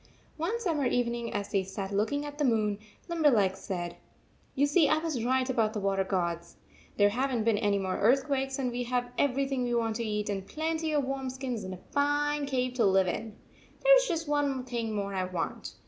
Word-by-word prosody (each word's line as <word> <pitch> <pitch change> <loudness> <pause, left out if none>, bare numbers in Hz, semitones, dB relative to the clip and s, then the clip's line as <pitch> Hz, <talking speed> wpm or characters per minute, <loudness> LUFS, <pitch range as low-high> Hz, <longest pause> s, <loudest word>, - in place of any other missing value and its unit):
One 360 +9 -1
summer 315 - 0
evening, 235 -1 -1
as 200 0 -3
they 195 - +2
sat 195 +1 -5
look 205 +5 +1
ing 285 +1 -1
at 290 0 -8
the - - +2
moon, 215 -5 +1 0.3
Limberleg 275 - +3
said: 175 -3 -5 0.3
" - - -35
You 280 +1 +4
see 295 +2 +4
I - - +4
was 310 -7 -2
right 260 +1 +2
about 225 -4 +1
the 215 - -2
water 195 -1 +1
gods. 170 -3 -2 0.4
There 205 0 +5
have 255 +6 0
n 255 - 0
t 220 - 0
been 220 -2 +2
any 205 -2 +2
more 190 -1 -2
earthquakes, 270 +4 +2
and 255 -3 -1
we 245 +1 -3
have 245 0 -1
everything 270 -1 +1
we 240 -1 0
want 225 -2 0
to 235 - -2
eat, 210 -1 -2
and 195 -2 -3
plenty 320 0 -2
of 295 -2 +2
warm 270 0 -3
skins 255 -3 -4
and 185 0 -5
a 180 - -19
fine 290 0 +1
cave 255 -2 0
to 235 - +3
live 190 -1 +4
in. 215 +4 -4 0.5
There - - +8
is - - +2
just 330 -4 -2
one 285 -3 0
thing 235 -3 -3
more 200 -1 -2
I 185 -1 0
want. 180 -1 -4
245 Hz, 225 wpm, -29 LUFS, 205-285 Hz, 0.5 s, There